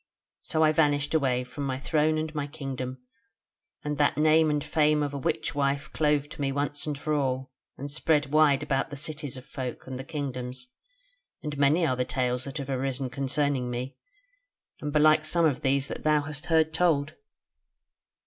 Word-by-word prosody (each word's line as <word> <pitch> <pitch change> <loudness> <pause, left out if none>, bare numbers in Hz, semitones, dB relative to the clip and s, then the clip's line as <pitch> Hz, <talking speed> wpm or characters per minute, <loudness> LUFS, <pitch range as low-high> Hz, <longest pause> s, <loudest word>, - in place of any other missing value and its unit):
So 160 - 0
I 155 - +5
vanished 145 -1 +2
away 130 -5 +2
from 125 +3 -7
my 130 -1 -1
throne 155 +1 +1
and 155 0 -3
my 145 -2 -2
kingdom, 130 -4 -6 0.8
and 150 -1 -3
that 145 - +3
name 155 +1 +5
and 150 -1 0
fame 150 0 +2
of 145 -1 -3
a - - -3
witch 155 +4 -1
wife 140 0 -1
clove 150 -2 +2
to - - -8
me 135 -1 +1
once 145 +1 -2
and 145 -2 -2
for 155 +2 -2
all, 130 -2 -1 0.3
and 140 +1 -6
spread 150 -1 +1
wide 150 -3 +4
about 135 +2 0
the 145 - -6
cities 150 -2 -4
of 130 - -10
folk 130 -4 -6
and 130 -1 -6
the - - -5
kingdoms, 130 -4 -5 0.7
and 150 -1 -3
many 145 +5 +3
are 130 -5 +1
the 125 - 0
tales 125 0 -1
that 140 +1 -5
have 140 -1 -4
arisen 135 0 -2
concerning 135 -1 0
me, 125 +2 -4 0.9
and 150 - -3
belike 155 +1 +5
some 170 -1 +2
of 145 -5 +1
these 135 +1 +1
thou 150 0 +1
hast 150 +2 -5
heard 160 -1 +3
told." 160 -4 +2
145 Hz, 185 wpm, -27 LUFS, 135-155 Hz, 0.9 s, I